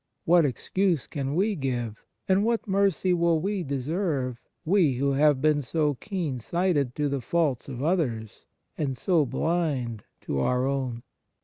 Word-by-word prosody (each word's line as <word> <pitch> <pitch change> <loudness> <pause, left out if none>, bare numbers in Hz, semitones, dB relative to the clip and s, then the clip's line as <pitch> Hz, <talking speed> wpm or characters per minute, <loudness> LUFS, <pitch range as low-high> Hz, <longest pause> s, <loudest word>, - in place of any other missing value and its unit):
What 170 -1 +5
excuse 175 +4 0
can 140 0 -3
we 205 +4 +2
give, 120 - -3 0.2
and 190 +1 +3
what 230 0 0
mercy 195 -2 +2
will 170 -2 +2
we 195 +3 -1
deserve 140 -3 -2 0.2
we 170 -5 +3
who 140 +3 +1
have 145 0 +3
been 150 -1 +3
so 150 +2 0
keen 160 - -4
sighted 150 - 0
to 150 -1 0
the 140 -1 -2
faults 145 -3 0
of 130 0 -5
others, 130 - -1 0.3
and 135 -4 -1
so 160 -1 +2
blind 135 - -1 0.2
to 70 - -2
our 125 - +1
own 130 -4 -2
145 Hz, 150 wpm, -26 LUFS, 130-175 Hz, 0.3 s, What